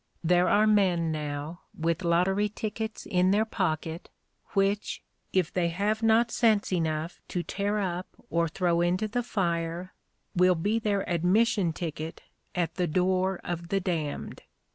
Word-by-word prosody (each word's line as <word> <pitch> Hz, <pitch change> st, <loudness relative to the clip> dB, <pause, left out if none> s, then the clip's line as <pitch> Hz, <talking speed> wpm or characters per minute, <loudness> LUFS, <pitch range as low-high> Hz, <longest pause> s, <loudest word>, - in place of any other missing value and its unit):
There 180 Hz, +2 st, +4 dB
are 210 Hz, +1 st, +5 dB
men 185 Hz, -6 st, +3 dB
now, 150 Hz, +2 st, -4 dB, 0.2 s
with 165 Hz, +2 st, 0 dB
lottery 185 Hz, +5 st, +2 dB
tickets 220 Hz, +1 st, -4 dB
in 180 Hz, 0 st, +2 dB
their 210 Hz, +3 st, +3 dB
pocket, 165 Hz, -5 st, -2 dB, 0.4 s
which, 200 Hz, +1 st, 0 dB, 0.3 s
if 185 Hz, -3 st, +1 dB
they 175 Hz, -2 st, +1 dB
have 205 Hz, +6 st, 0 dB
not 225 Hz, +1 st, +4 dB
sense 215 Hz, -4 st, +2 dB
enough 160 Hz, -1 st, -1 dB
to 175 Hz, -, -2 dB
tear 205 Hz, +3 st, -1 dB
up 185 Hz, -2 st, -2 dB, 0.2 s
or 170 Hz, 0 st, +2 dB
throw 170 Hz, +1 st, +1 dB
into 180 Hz, +5 st, +1 dB
the 245 Hz, +4 st, -1 dB
fire, 175 Hz, -5 st, -2 dB, 0.4 s
will 180 Hz, 0 st, +5 dB
be 205 Hz, +7 st, 0 dB
their 205 Hz, -3 st, 0 dB
admission 180 Hz, +2 st, +2 dB
ticket 160 Hz, -1 st, -5 dB, 0.3 s
at 170 Hz, -3 st, -1 dB
the 180 Hz, -1 st, +1 dB
door 185 Hz, +3 st, +1 dB
of 170 Hz, -1 st, -4 dB
the 195 Hz, +3 st, +1 dB
damned. 165 Hz, -6 st, -3 dB
180 Hz, 145 wpm, -28 LUFS, 170-205 Hz, 0.4 s, are